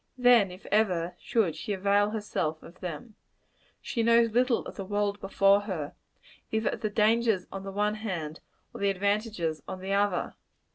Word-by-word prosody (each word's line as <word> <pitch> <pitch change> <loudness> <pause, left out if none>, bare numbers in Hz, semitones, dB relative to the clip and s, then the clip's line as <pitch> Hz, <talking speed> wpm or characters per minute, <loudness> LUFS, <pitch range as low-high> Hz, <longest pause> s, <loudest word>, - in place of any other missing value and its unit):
Then, 245 -5 +5
if 180 +1 -12
ever, 180 -5 +2
should 205 -9 0
she 210 - -4
avail 200 +1 +2
herself 205 -7 -3
of 170 - -14
them. 185 +7 -6 0.7
She 235 - -2
knows 230 0 +4
little 245 +1 +2
of - - -8
the 195 - -5
world 205 +1 -1
before 195 0 +4
her 180 -8 -4 0.6
either 220 0 +1
of - - -6
the 215 - 0
dangers 215 -2 +2
on 195 - -5
the 195 0 -6
one 210 +2 +1
hand, 180 -8 -4 0.3
or - - -8
the 200 - +3
advantages 200 -4 -1
on 185 - -5
the 190 +1 -3
other. 200 -2 +1
205 Hz, 175 wpm, -28 LUFS, 185-220 Hz, 0.7 s, Then